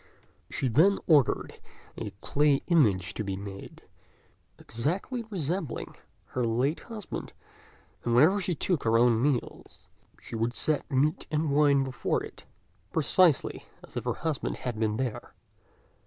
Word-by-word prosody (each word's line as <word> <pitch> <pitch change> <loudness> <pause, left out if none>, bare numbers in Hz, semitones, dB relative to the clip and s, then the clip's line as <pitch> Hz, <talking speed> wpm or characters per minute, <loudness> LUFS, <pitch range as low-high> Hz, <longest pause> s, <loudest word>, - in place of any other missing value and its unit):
She 135 - -1
then 165 - +4
ordered 145 -7 +2 0.3
a - - -5
clay 145 -1 +2
image 105 - +2
to 110 - -3
be 100 -2 -3
made, 100 0 -9 0.7
exactly 175 - -2
resembling 170 - -3 0.3
her 125 - -2
late 125 +7 +1
husband; 220 -4 -7 0.7
and 120 -1 +1
whenever 170 +11 +5
she 180 -2 -1
took 170 +1 0
her 115 0 +3
own 115 -1 +4
meals, 135 -2 -2 0.3
she - - -8
would 115 +2 -1
set 155 -2 0
meat 145 +6 +1
and 155 -1 0
wine 140 -1 +4
before 130 -2 -1
it, - - -11 0.5
precisely 160 0 +2 0.2
as - - -13
if - - -3
her - - 0
husband 160 -4 -2
had 120 -4 -4
been 110 -1 0
there. 130 -3 -4
140 Hz, 140 wpm, -28 LUFS, 115-160 Hz, 0.7 s, whenever